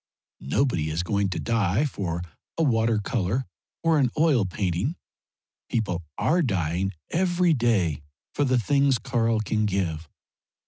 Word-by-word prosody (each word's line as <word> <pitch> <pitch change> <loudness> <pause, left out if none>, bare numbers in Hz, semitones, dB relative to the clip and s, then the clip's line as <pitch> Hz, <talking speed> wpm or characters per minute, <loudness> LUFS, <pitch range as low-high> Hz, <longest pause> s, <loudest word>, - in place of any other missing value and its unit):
Nobody 85 - +1
is 80 +3 -1
going 100 +1 0
to 95 - -3
die 115 +2 +1
for 90 - -3 0.3
a 165 - +2
water 115 -5 +2
colour 115 +2 -1 0.4
or 165 -2 +3
an 130 -3 +3
oil 150 -9 +3
painting; 95 - -1 0.7
people 95 -7 -1 0.2
are 175 +3 +2
dying 95 - 0 0.2
every 175 -1 +2
day 105 - +1 0.3
for 145 - +1
the 130 -2 +2
things 140 +2 +3
Karl 115 -1 0
can 110 0 0
give. 85 -6 -2
110 Hz, 135 wpm, -25 LUFS, 90-135 Hz, 0.7 s, or